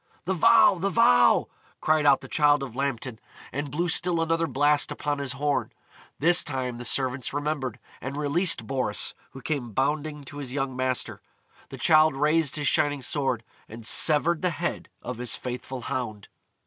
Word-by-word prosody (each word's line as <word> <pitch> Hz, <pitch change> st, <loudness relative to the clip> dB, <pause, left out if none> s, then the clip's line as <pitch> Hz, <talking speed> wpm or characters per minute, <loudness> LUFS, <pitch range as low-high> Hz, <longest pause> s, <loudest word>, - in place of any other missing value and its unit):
"The 190 Hz, -, 0 dB
vow! 195 Hz, +2 st, +5 dB
the 195 Hz, +3 st, 0 dB
vow!" 85 Hz, -, +4 dB, 0.3 s
cried 155 Hz, -1 st, +2 dB
out 140 Hz, -1 st, +5 dB
the -, -, -10 dB
Childe 145 Hz, -2 st, +2 dB
of 125 Hz, -4 st, -8 dB
Lambton, 130 Hz, -4 st, -3 dB, 0.3 s
and 145 Hz, +1 st, -4 dB
blew 170 Hz, +6 st, -2 dB
still 175 Hz, 0 st, +2 dB
another 165 Hz, 0 st, 0 dB
blast 145 Hz, +1 st, +2 dB
upon 145 Hz, -1 st, -3 dB
his 140 Hz, -2 st, -3 dB
horn. 145 Hz, +1 st, -1 dB, 0.5 s
This 170 Hz, +4 st, +3 dB
time 130 Hz, -4 st, -4 dB
the 120 Hz, -, -7 dB
servants 130 Hz, +1 st, 0 dB
remembered, 145 Hz, -5 st, -3 dB, 0.2 s
and 135 Hz, +2 st, -6 dB
released 155 Hz, +5 st, +1 dB
Boris, 135 Hz, -1 st, -1 dB, 0.2 s
who 135 Hz, -1 st, -11 dB
came 130 Hz, -8 st, -3 dB
bounding 150 Hz, +3 st, -2 dB
to 140 Hz, +2 st, -11 dB
his 135 Hz, -2 st, -6 dB
young 135 Hz, -2 st, -2 dB
master. 130 Hz, 0 st, -2 dB, 0.5 s
The -, -, -9 dB
Childe 155 Hz, -2 st, +4 dB
raised 150 Hz, 0 st, +1 dB
his 145 Hz, -2 st, -1 dB
shining 145 Hz, -2 st, +1 dB
sword, 130 Hz, -4 st, -1 dB, 0.3 s
and 115 Hz, +1 st, -10 dB
severed 155 Hz, +6 st, +4 dB
the 180 Hz, -, +1 dB
head 170 Hz, 0 st, -4 dB
of 125 Hz, -1 st, -6 dB
his 125 Hz, -1 st, -2 dB
faithful 125 Hz, +1 st, -6 dB
hound. 110 Hz, -4 st, -5 dB
145 Hz, 170 wpm, -25 LUFS, 130-155 Hz, 0.5 s, vow